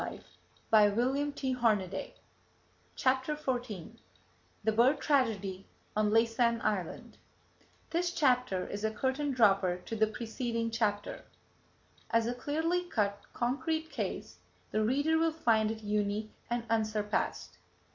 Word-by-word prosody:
[Page -, -, -7 dB, 0.5 s
137] 235 Hz, -2 st, +2 dB, 0.8 s
CHAPTER 260 Hz, +3 st, +1 dB
XIV 240 Hz, -, -4 dB, 0.7 s
THE 220 Hz, -, +3 dB
BIRD 235 Hz, +6 st, +4 dB
TRAGEDY 205 Hz, -9 st, 0 dB, 0.3 s
ON 210 Hz, 0 st, +2 dB
LAYSAN 230 Hz, +1 st, +3 dB
ISLAND 195 Hz, -6 st, -2 dB, 0.7 s
This 345 Hz, +1 st, +1 dB
chapter 250 Hz, -, +2 dB
is 205 Hz, +1 st, -5 dB
a 220 Hz, -, +2 dB
curtain 265 Hz, +6 st, -1 dB
dropper 195 Hz, -8 st, +3 dB
to 225 Hz, -, -4 dB
the 220 Hz, 0 st, +3 dB
preceding 230 Hz, +1 st, -3 dB
chapter. 210 Hz, -2 st, -1 dB, 0.9 s
As 230 Hz, 0 st, +2 dB
a 240 Hz, -, 0 dB
clearly 320 Hz, +7 st, -1 dB
cut, 205 Hz, -10 st, -1 dB
concrete 315 Hz, +6 st, -1 dB
case, 210 Hz, -, -4 dB, 0.3 s
the 215 Hz, -, +1 dB
reader 285 Hz, +8 st, +2 dB
will 325 Hz, 0 st, +3 dB
find 225 Hz, -8 st, +2 dB
it 220 Hz, 0 st, -5 dB
unique 210 Hz, +1 st, -1 dB, 0.2 s
and 240 Hz, -1 st, -1 dB
unsurpassed. 215 Hz, -2 st, -1 dB
230 Hz, 115 wpm, -31 LUFS, 210-265 Hz, 0.9 s, BIRD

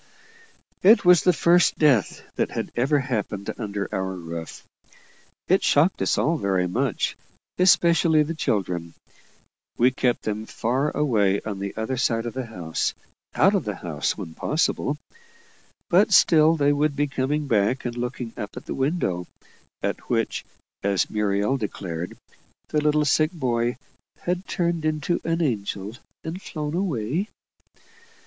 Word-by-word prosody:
It 205 Hz, +1 st, +6 dB
was 180 Hz, -2 st, +7 dB
the 180 Hz, -, +4 dB
first 175 Hz, +1 st, +3 dB
death 135 Hz, -, +2 dB
that -, -, 0 dB
had -, -, -4 dB
ever 135 Hz, +5 st, +2 dB
happened 105 Hz, -6 st, -3 dB
under 100 Hz, -3 st, -3 dB
our 95 Hz, 0 st, -2 dB
roof. 85 Hz, -2 st, -7 dB, 0.8 s
It 190 Hz, +2 st, +4 dB
shocked 160 Hz, +6 st, +3 dB
us -, -, +1 dB
all 160 Hz, +3 st, +2 dB
very 95 Hz, -4 st, +1 dB
much, 120 Hz, +4 st, -1 dB, 0.4 s
especially 170 Hz, -3 st, +4 dB
the 160 Hz, +3 st, -4 dB
children. 90 Hz, -, -2 dB, 0.8 s
We 125 Hz, +2 st, +4 dB
kept 125 Hz, -1 st, 0 dB
them 110 Hz, +1 st, -3 dB
far 130 Hz, +6 st, 0 dB
away 105 Hz, -9 st, +2 dB
on 105 Hz, -2 st, -5 dB
the 100 Hz, 0 st, -5 dB
other 110 Hz, +4 st, -2 dB
side 115 Hz, -2 st, 0 dB
of 120 Hz, -, -4 dB
the 130 Hz, -2 st, -4 dB
house 85 Hz, -8 st, -3 dB, 0.4 s
out -, -, +4 dB
of -, -, +1 dB
the -, -, -4 dB
house, -, -, -3 dB
when 80 Hz, -, -7 dB
possible 150 Hz, -, 0 dB, 0.9 s
but 195 Hz, +4 st, +4 dB
still 160 Hz, -3 st, +6 dB
they 145 Hz, -1 st, +3 dB
would 145 Hz, 0 st, +1 dB
be 145 Hz, -, +1 dB
coming 145 Hz, +2 st, -1 dB
back 115 Hz, +1 st, +1 dB
and 120 Hz, -1 st, -3 dB
looking 120 Hz, -1 st, -4 dB
up 105 Hz, +3 st, -7 dB
at -, -, -8 dB
the -, -, -4 dB
window, 130 Hz, -, -1 dB, 0.6 s
at -, -, -3 dB
which, -, -, 0 dB, 0.4 s
as 100 Hz, -1 st, 0 dB
Muriel 105 Hz, +4 st, +1 dB
declared, 90 Hz, -6 st, -5 dB, 0.5 s
the 150 Hz, -, +1 dB
little 150 Hz, 0 st, +2 dB
sick 155 Hz, +2 st, +3 dB
boy 120 Hz, -7 st, -1 dB, 0.4 s
"had 180 Hz, +2 st, -2 dB
turned 170 Hz, -3 st, -1 dB
into 155 Hz, +2 st, 0 dB
an 165 Hz, +1 st, 0 dB
angel 105 Hz, -5 st, -2 dB, 0.3 s
and 170 Hz, +4 st, -5 dB
flown 150 Hz, -4 st, -5 dB
away." 170 Hz, -, -1 dB
130 Hz, 145 wpm, -24 LUFS, 105-155 Hz, 0.9 s, was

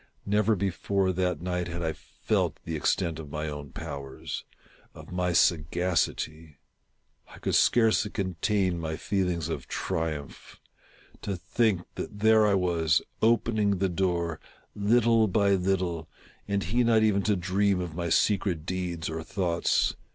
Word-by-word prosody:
Never 105 Hz, +2 st, +2 dB
before 95 Hz, 0 st, 0 dB
that 90 Hz, -1 st, -1 dB
night 90 Hz, -1 st, -2 dB
had 85 Hz, 0 st, -4 dB
I. 80 Hz, -1 st, -1 dB
felt -, -, -2 dB
the 80 Hz, -, -3 dB
extent 80 Hz, +1 st, 0 dB
of 75 Hz, -3 st, -8 dB
my 75 Hz, +1 st, -3 dB
own 75 Hz, -1 st, -6 dB
powers 70 Hz, -1 st, -6 dB, 0.2 s
— -, -, -29 dB
of -, -, -12 dB
my 90 Hz, 0 st, 0 dB
sagacity. 80 Hz, -2 st, 0 dB, 0.7 s
I -, -, -14 dB
could -, -, -2 dB
scarcely 115 Hz, -2 st, +4 dB
contain 95 Hz, -1 st, 0 dB
my 80 Hz, -1 st, -3 dB
feelings 90 Hz, -4 st, -1 dB
of 70 Hz, -6 st, -5 dB
triumph. 80 Hz, -5 st, -4 dB, 0.6 s
To 100 Hz, -, -3 dB
think 105 Hz, -1 st, +1 dB
that 105 Hz, -, -6 dB
there 110 Hz, 0 st, +5 dB
I 100 Hz, -, +3 dB
was, 85 Hz, -4 st, +2 dB, 0.2 s
opening 110 Hz, -3 st, +2 dB
the 95 Hz, +1 st, +1 dB
door, 85 Hz, -3 st, -1 dB, 0.3 s
little 115 Hz, +2 st, +3 dB
by 100 Hz, +1 st, +2 dB
little, 90 Hz, -4 st, 0 dB, 0.4 s
and 100 Hz, -1 st, 0 dB
he 120 Hz, +8 st, +1 dB
not 115 Hz, -2 st, +4 dB
even 105 Hz, -2 st, +3 dB
to 105 Hz, +1 st, +1 dB
dream 95 Hz, +2 st, +1 dB
of 90 Hz, -3 st, -4 dB
my 85 Hz, +1 st, -3 dB
secret 90 Hz, -3 st, +1 dB
deeds 90 Hz, -2 st, -3 dB
or 80 Hz, 0 st, -4 dB
thoughts. 85 Hz, +1 st, 0 dB
90 Hz, 145 wpm, -28 LUFS, 80-100 Hz, 0.7 s, there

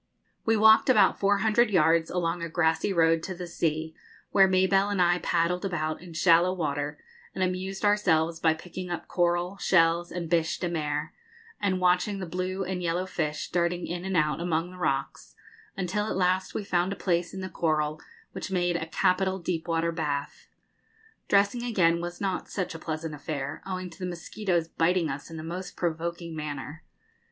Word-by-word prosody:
We 225 Hz, 0 st, +3 dB
walked 220 Hz, +3 st, +6 dB
about 255 Hz, -, +5 dB
four 200 Hz, 0 st, +3 dB
hundred 220 Hz, +2 st, +4 dB
yards 165 Hz, -3 st, +3 dB
along 175 Hz, -1 st, -1 dB
a 170 Hz, -, -3 dB
grassy 160 Hz, +3 st, +1 dB
road 165 Hz, -2 st, +3 dB
to 185 Hz, +2 st, -5 dB
the 180 Hz, 0 st, -6 dB
sea, 160 Hz, -2 st, -2 dB, 0.4 s
where 195 Hz, -1 st, +6 dB
Mabelle 190 Hz, +1 st, +3 dB
and 200 Hz, -2 st, -1 dB
I 175 Hz, 0 st, +4 dB
paddled 175 Hz, +1 st, 0 dB
about 155 Hz, -5 st, -2 dB
in 175 Hz, -2 st, -11 dB
shallow 170 Hz, +2 st, +4 dB
water 145 Hz, -3 st, -2 dB, 0.4 s
and 190 Hz, -, 0 dB
amused 185 Hz, +2 st, -2 dB
ourselves 170 Hz, -6 st, +2 dB
by 160 Hz, -1 st, +3 dB
picking 180 Hz, +2 st, -8 dB
up 175 Hz, -, -4 dB
coral, 175 Hz, +2 st, 0 dB
shells, 170 Hz, -2 st, +3 dB
and 175 Hz, -2 st, -4 dB
bêche 160 Hz, -1 st, +1 dB
de 175 Hz, -, -1 dB
mer, 150 Hz, -2 st, -2 dB, 0.5 s
and 190 Hz, -2 st, +1 dB
watching 180 Hz, +3 st, +2 dB
the 190 Hz, -, -4 dB
blue 185 Hz, +2 st, -3 dB
and 185 Hz, 0 st, -3 dB
yellow 175 Hz, +1 st, -1 dB
fish 150 Hz, -5 st, -3 dB
darting 175 Hz, 0 st, 0 dB
in 175 Hz, +1 st, -4 dB
and 190 Hz, -1 st, -1 dB
out 150 Hz, +1 st, +1 dB
among 170 Hz, 0 st, -1 dB
the 185 Hz, -, -12 dB
rocks, 135 Hz, -5 st, -2 dB, 0.4 s
until 195 Hz, +3 st, -1 dB
at -, -, -2 dB
last 185 Hz, 0 st, +1 dB
we -, -, -2 dB
found 180 Hz, -1 st, 0 dB
a -, -, -2 dB
place 175 Hz, -3 st, 0 dB
in 190 Hz, -, -6 dB
the 185 Hz, -, -4 dB
coral 155 Hz, -3 st, -1 dB, 0.3 s
which -, -, -6 dB
made 175 Hz, -2 st, +1 dB
a 160 Hz, -, -5 dB
capital 190 Hz, +2 st, +1 dB
deep 170 Hz, -2 st, -3 dB
water 165 Hz, 0 st, +1 dB
bath. 145 Hz, -4 st, -3 dB, 0.8 s
Dressing 200 Hz, +4 st, +3 dB
again 180 Hz, -8 st, +2 dB
was 175 Hz, 0 st, -6 dB
not 190 Hz, -2 st, -2 dB
such 185 Hz, -4 st, -3 dB
a 165 Hz, -, -7 dB
pleasant 155 Hz, 0 st, -4 dB
affair, 145 Hz, -2 st, -5 dB
owing 185 Hz, -1 st, -4 dB
to 160 Hz, -, -15 dB
the 180 Hz, -, -3 dB
mosquitoes 175 Hz, 0 st, -2 dB
biting 165 Hz, 0 st, +1 dB
us 140 Hz, +1 st, -7 dB
in 165 Hz, -, -8 dB
the 155 Hz, -, -6 dB
most 180 Hz, +3 st, -6 dB
provoking 170 Hz, 0 st, -3 dB
manner. 150 Hz, 0 st, -6 dB
175 Hz, 185 wpm, -27 LUFS, 160-185 Hz, 0.8 s, walked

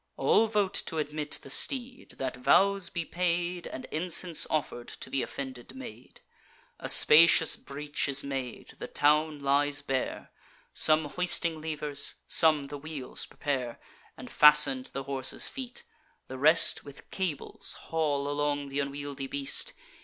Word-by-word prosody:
All 225 Hz, -, +3 dB
vote 205 Hz, -3 st, -1 dB
t' 160 Hz, -, -4 dB
admit 150 Hz, 0 st, -3 dB
the 135 Hz, -, -9 dB
steed, 255 Hz, -, -1 dB
that 130 Hz, -1 st, -4 dB
vows 195 Hz, +8 st, +2 dB
be 170 Hz, -2 st, -4 dB
paid 175 Hz, 0 st, -2 dB
And 130 Hz, -, -8 dB
incense 170 Hz, 0 st, +1 dB
offer'd 145 Hz, -6 st, -3 dB
to -, -, -8 dB
th' 135 Hz, -, 0 dB
offended 130 Hz, -, -7 dB
maid. 260 Hz, -4 st, -12 dB, 0.6 s
A -, -, -6 dB
spacious 165 Hz, +1 st, +7 dB
breach 145 Hz, +1 st, -4 dB
is 140 Hz, 0 st, +2 dB
made; 135 Hz, -3 st, -6 dB
the -, -, -6 dB
town 150 Hz, +1 st, +1 dB
lies 145 Hz, +1 st, +1 dB
bare; 135 Hz, -2 st, -4 dB, 0.4 s
Some 155 Hz, 0 st, +3 dB
hoisting 170 Hz, 0 st, -1 dB
levers, 150 Hz, -2 st, -2 dB
some 155 Hz, -3 st, +4 dB
the 145 Hz, +1 st, -8 dB
wheels 145 Hz, -3 st, -6 dB
prepare 130 Hz, -5 st, -4 dB, 0.4 s
And -, -, -11 dB
fasten 150 Hz, -3 st, +6 dB
to -, -, -8 dB
the 135 Hz, -, -5 dB
horse's 135 Hz, -1 st, +2 dB
feet; 265 Hz, -, -7 dB, 0.4 s
the 130 Hz, 0 st, -8 dB
rest 155 Hz, +4 st, +3 dB
With 140 Hz, 0 st, -14 dB
cables 180 Hz, -7 st, -4 dB
haul 145 Hz, -3 st, -2 dB
along 145 Hz, -1 st, -2 dB
th' 140 Hz, -, -2 dB
unwieldly 140 Hz, -1 st, -5 dB
beast. 140 Hz, 0 st, -1 dB
150 Hz, 145 wpm, -28 LUFS, 140-165 Hz, 0.6 s, spacious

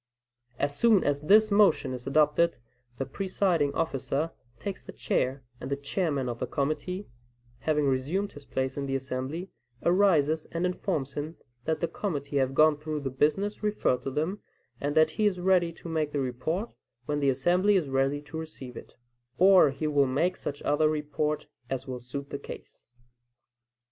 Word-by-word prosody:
As 145 Hz, +1 st, 0 dB
soon 220 Hz, +2 st, +4 dB
as 145 Hz, 0 st, 0 dB
this 215 Hz, +7 st, +5 dB
motion 195 Hz, -10 st, +4 dB
is 125 Hz, 0 st, -7 dB
adopted, 155 Hz, +4 st, +3 dB, 0.4 s
the 135 Hz, -, -2 dB
presiding 175 Hz, -1 st, 0 dB
officer 160 Hz, 0 st, -1 dB, 0.3 s
takes 195 Hz, -, -5 dB
the -, -, -9 dB
chair, 130 Hz, +1 st, -1 dB, 0.2 s
and -, -, -6 dB
the 140 Hz, -, +1 dB
chairman 140 Hz, -1 st, -1 dB
of 120 Hz, -1 st, -4 dB
the -, -, -2 dB
committee, 155 Hz, +7 st, -2 dB, 0.5 s
having 150 Hz, +5 st, +1 dB
resumed 145 Hz, +10 st, 0 dB
his 145 Hz, -, -12 dB
place 130 Hz, -1 st, -2 dB
in 140 Hz, -1 st, -2 dB
the 135 Hz, -, -1 dB
assembly, 135 Hz, +7 st, -4 dB, 0.3 s
arises 165 Hz, -5 st, +3 dB
and 170 Hz, +2 st, -1 dB
informs 170 Hz, -6 st, -2 dB
him, 150 Hz, +3 st, -5 dB, 0.3 s
that 160 Hz, -1 st, -1 dB
"the 170 Hz, -, +1 dB
committee 145 Hz, -9 st, -3 dB
have 135 Hz, 0 st, +1 dB
gone 155 Hz, 0 st, +5 dB
through 155 Hz, 0 st, -4 dB
the 135 Hz, -2 st, -3 dB
business 195 Hz, +10 st, 0 dB
referred 210 Hz, -, +1 dB
to -, -, -3 dB
them, 160 Hz, +9 st, -2 dB, 0.4 s
and 145 Hz, +1 st, -2 dB
that 155 Hz, 0 st, +5 dB
he 210 Hz, -, +5 dB
is 185 Hz, -3 st, -1 dB
ready 180 Hz, -2 st, +3 dB
to 170 Hz, -, -11 dB
make 155 Hz, -2 st, -1 dB
the 145 Hz, -, 0 dB
report, 140 Hz, -, -2 dB, 0.3 s
when 145 Hz, +2 st, -1 dB
the 140 Hz, -1 st, +3 dB
assembly 180 Hz, +10 st, +3 dB
is 175 Hz, -6 st, +2 dB
ready 135 Hz, +2 st, 0 dB
to 155 Hz, +2 st, -6 dB
receive 135 Hz, -6 st, -8 dB
it;" -, -, -11 dB, 0.4 s
or 185 Hz, -4 st, +7 dB
he 140 Hz, +3 st, -4 dB
will 145 Hz, -2 st, +3 dB
make 155 Hz, +8 st, +1 dB
such 145 Hz, 0 st, -6 dB
other 155 Hz, +1 st, +3 dB
report 150 Hz, 0 st, -1 dB, 0.2 s
as 135 Hz, -1 st, -3 dB
will 130 Hz, -1 st, -4 dB
suit 140 Hz, +3 st, -7 dB
the 140 Hz, -, -4 dB
case. -, -, -11 dB
150 Hz, 175 wpm, -28 LUFS, 135-175 Hz, 0.5 s, or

